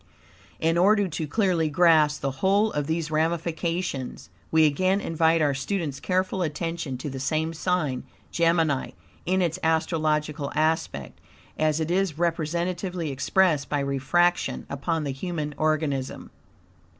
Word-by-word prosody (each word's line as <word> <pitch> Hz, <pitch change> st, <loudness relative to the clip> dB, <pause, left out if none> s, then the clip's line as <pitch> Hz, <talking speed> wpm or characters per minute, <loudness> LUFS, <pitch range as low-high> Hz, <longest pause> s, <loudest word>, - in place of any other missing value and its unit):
In 165 Hz, +1 st, +2 dB
order 205 Hz, +2 st, +4 dB
to 160 Hz, -2 st, -4 dB
clearly 175 Hz, -3 st, +1 dB
grasp 155 Hz, -2 st, +4 dB
the 140 Hz, -, -1 dB
whole 200 Hz, +3 st, +3 dB
of 145 Hz, -1 st, -2 dB
these 160 Hz, -1 st, -2 dB
ramifications, 165 Hz, -2 st, -2 dB, 0.2 s
we 160 Hz, -1 st, +5 dB
again 185 Hz, +6 st, +2 dB
invite 165 Hz, -2 st, +2 dB
our 145 Hz, -2 st, +2 dB
student's 145 Hz, 0 st, -3 dB
careful 185 Hz, 0 st, 0 dB
attention 165 Hz, -3 st, -3 dB
to 135 Hz, +4 st, -5 dB
the 135 Hz, -, -5 dB
same 155 Hz, +4 st, -1 dB
sign, 160 Hz, -7 st, -1 dB, 0.3 s
Gemini, 165 Hz, -5 st, +1 dB, 0.3 s
in 185 Hz, +1 st, +2 dB
its 170 Hz, +1 st, -1 dB
astrological 155 Hz, -2 st, 0 dB
aspect, 155 Hz, +2 st, -1 dB, 0.3 s
as 155 Hz, 0 st, +1 dB
it 160 Hz, +1 st, -1 dB
is 185 Hz, -4 st, 0 dB
representatively 170 Hz, +1 st, -1 dB
expressed 145 Hz, +2 st, +2 dB
by 145 Hz, -, 0 dB
refraction 140 Hz, +6 st, +1 dB
upon 160 Hz, +3 st, -1 dB
the 140 Hz, -, -2 dB
human 150 Hz, +1 st, -4 dB
organism. 150 Hz, -3 st, -1 dB
160 Hz, 130 wpm, -25 LUFS, 150-175 Hz, 0.3 s, we